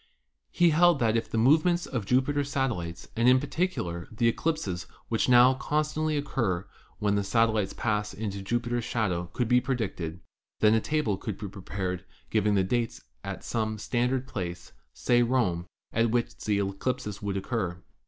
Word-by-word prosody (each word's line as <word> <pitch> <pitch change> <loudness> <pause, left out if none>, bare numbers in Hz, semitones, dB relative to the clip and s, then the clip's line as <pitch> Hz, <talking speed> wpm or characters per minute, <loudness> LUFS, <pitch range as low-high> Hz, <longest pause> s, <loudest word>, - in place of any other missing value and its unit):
He 175 -1 +4
held 175 +1 +5
that 115 -3 +2
if 115 - -1
the - - -2
movements 160 +9 +4
o 125 - +1
f 100 - -8
Jupiter's 140 +3 +1
satellites 110 - -2
and, 115 +2 +4
in 130 +1 +6
particular, 135 - -2
the 115 +1 +1
eclipses 110 - -1 0.2
which 115 +2 +1
constantly 150 +5 +3
occur 110 -10 -1 0.3
when 105 -2 +1
the 100 0 +1
satellites 110 -1 +2
pass 105 -2 -1
into 100 -1 -4
Jupiter's 120 +3 -1
shadow, 90 -7 -1
could 125 +5 -1
be 125 +1 +4
predicted, 95 -11 -3 0.4
then 105 0 +5
a 110 - +3
table 150 -10 0
could 100 0 -5
be 105 - -5
prepared 95 -1 -4 0.3
giving 105 -1 +2
the 95 - +3
dates 115 +4 -1 0.2
at - - -6
some 110 -1 -2
standard 125 +4 0
place, 90 -7 -5 0.2
say 120 0 +2
Rome, 115 -9 +1 0.3
at 115 +1 +2
which 120 +1 0
the 105 -1 -1
eclipses 100 +2 -2
would 100 -1 -2
occur. 95 -4 -2
115 Hz, 165 wpm, -28 LUFS, 100-130 Hz, 0.4 s, in